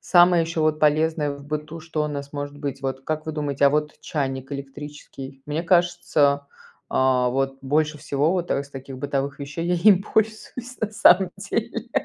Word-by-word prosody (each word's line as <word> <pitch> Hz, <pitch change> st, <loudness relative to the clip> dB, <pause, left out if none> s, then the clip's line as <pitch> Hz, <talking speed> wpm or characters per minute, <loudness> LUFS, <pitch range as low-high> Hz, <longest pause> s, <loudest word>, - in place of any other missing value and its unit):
самое 175 Hz, -1 st, +5 dB
ещё 165 Hz, -1 st, -2 dB
вот 155 Hz, 0 st, +1 dB
полезное 155 Hz, 0 st, +2 dB
в 140 Hz, 0 st, -10 dB
быту 150 Hz, +2 st, -5 dB
что 155 Hz, -1 st, -2 dB
у -, -, -2 dB
нас 140 Hz, -1 st, -6 dB
может 145 Hz, 0 st, -5 dB
быть? 145 Hz, -2 st, -4 dB
Вот 135 Hz, 0 st, -4 dB
как 155 Hz, 0 st, -3 dB
вы 160 Hz, -, -2 dB
думаете, 145 Hz, -2 st, +1 dB
а -, -, +5 dB
вот 150 Hz, +1 st, -1 dB
чайник 135 Hz, -3 st, -3 dB
электрический? 140 Hz, -1 st, -8 dB
Мне 150 Hz, +3 st, -2 dB
кажется, 170 Hz, -5 st, +2 dB, 0.4 s
а, 130 Hz, -1 st, +3 dB
вот 135 Hz, +1 st, -1 dB
больше 150 Hz, +2 st, 0 dB
всего 145 Hz, +2 st, +1 dB
вот, 180 Hz, -2 st, -2 dB
а, -, -, +2 dB
из 140 Hz, -, -9 dB
таких 135 Hz, -1 st, -8 dB
бытовых 140 Hz, 0 st, -2 dB
вещей 145 Hz, +4 st, -4 dB
я 180 Hz, -, +2 dB
им 190 Hz, +1 st, +5 dB
пользуюсь 220 Hz, +4 st, -2 dB
на 220 Hz, -, -1 dB
самом 190 Hz, -3 st, +5 dB
деле.. -, -, -3 dB
150 Hz, 185 wpm, -24 LUFS, 140-165 Hz, 0.4 s, самое